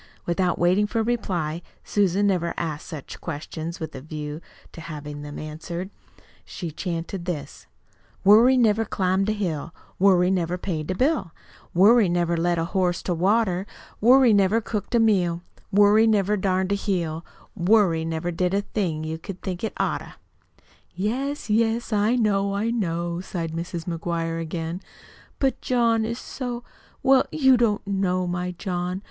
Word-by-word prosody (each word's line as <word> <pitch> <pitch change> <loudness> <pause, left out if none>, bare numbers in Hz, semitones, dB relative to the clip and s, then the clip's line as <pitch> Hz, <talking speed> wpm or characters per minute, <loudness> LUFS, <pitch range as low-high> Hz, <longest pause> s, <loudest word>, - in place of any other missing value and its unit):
Without 175 0 0
waiting 185 +4 +3
for 225 +2 -1
a - - +1
reply 175 -9 -2 0.2
Susan 200 0 +1
never 180 -4 0
asked 155 -3 -4
such 155 -6 -8
questions 160 +2 -5
with 160 -2 -5
a 130 - -7
view 150 +1 -6 0.3
to 165 - -10
having 150 -2 -7
them 145 0 -7
answered 170 +5 -6 0.5
she 170 -4 -6
chanted 170 +2 -4
this: 140 - -5 0.6
"Worry 230 +6 +7
never 225 -2 +3
climbed 190 -1 0
a - - +3
hill, 170 -7 -3 0.2
Worry 185 -1 +4
never 180 -1 0
paid 165 -4 -4
a 185 - 0
bill, 250 - 0 0.4
Worry 205 +2 +6
never 175 0 +1
led 170 +1 +1
a 165 - 0
horse 180 0 0
to 180 - -1
water. 190 +1 +1 0.3
Worry 250 +1 +6
never 200 +2 +4
cooked 215 0 -3
a - - +5
meal, 180 -6 +2 0.3
Worry 205 +2 +5
never 210 -1 +2
darned 190 -1 0
a - - +3
heel, 170 -5 -2 0.3
Worry 180 -3 +3
never 165 +1 -2
did 180 +2 0
a 200 - +2
thing 170 -8 -2
you'd 160 +1 -5 0.2
think 180 0 -4
it 220 - -1
oughter!" - - -2 0.8
"Yes, 260 +9 -2
yes, 225 +1 +1
I 210 +3 +3
know, 200 -4 +1
I 220 +3 0
know," 170 -5 -2
sighed 170 -3 -4
Mrs. 170 0 -5
McGuire 165 -1 -2
again. 165 +2 -4 0.6
"But 270 -1 0
John 230 -3 +2
is 230 +1 -3
so 245 -2 -5 0.4
well, 265 -1 +5
you 265 -4 +5
don't 225 -4 +1
know 190 -2 0
my 180 0 -2
John. 180 -1 -3
185 Hz, 155 wpm, -24 LUFS, 170-210 Hz, 0.8 s, Worry